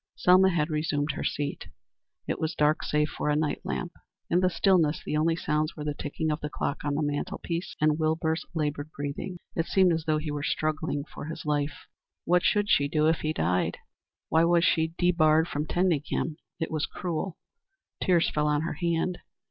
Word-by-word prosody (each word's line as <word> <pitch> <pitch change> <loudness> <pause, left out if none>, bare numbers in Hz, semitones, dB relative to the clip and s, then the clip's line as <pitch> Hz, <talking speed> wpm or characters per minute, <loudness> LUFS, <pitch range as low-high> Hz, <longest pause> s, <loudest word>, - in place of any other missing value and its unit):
Selma 185 +1 +5
had 165 -3 0
resumed 150 -1 0
her - - -5
seat. 145 -1 -3 0.6
It - - -2
was 160 0 -2
dark 150 +1 +2
save 150 0 +1
for - - -2
a 150 - +3
night 150 -1 0
lamp. 185 -2 -3 0.4
In 175 - +4
the 185 0 +3
stillness 175 -5 +3
the - - -2
only 160 +2 +2
sounds 155 -1 -1
were 150 - -6
the 150 0 -1
ticking 155 +2 -3
of 150 - -1
the 150 - -3
clock 145 - -3
on 145 -1 -1
the 155 - 0
mantel 145 0 -2
piece 170 +1 -4
and 155 0 +2
Wilbur's 160 +1 0
labored 150 -1 -2
breathing. 145 +6 -4 0.2
It 165 - 0
seemed 185 -3 +4
as 160 -1 -2
though 155 -1 +2
he 155 0 -3
were 145 0 -3
struggling 155 0 -1
for 145 - -9
his 160 +1 -7
life. 145 -1 -1 0.4
What 180 +1 +4
should 205 +2 +2
she 140 -7 +3
do 155 +1 +1
if 160 0 +3
he 155 - -1
died? 90 - 0 0.5
Why 160 +1 +4
was 170 0 +4
she 160 0 +2
debarred 160 -2 +4
from 150 0 -3
tending 175 -5 +2
him? 155 0 -2 0.2
It 160 - -2
was 155 -2 -1
cruel. 175 0 -4 0.7
Tears 175 -2 +3
fell 150 0 0
on 150 0 +2
her 165 - -2
hand. 170 +1 0
155 Hz, 200 wpm, -28 LUFS, 150-170 Hz, 0.7 s, Selma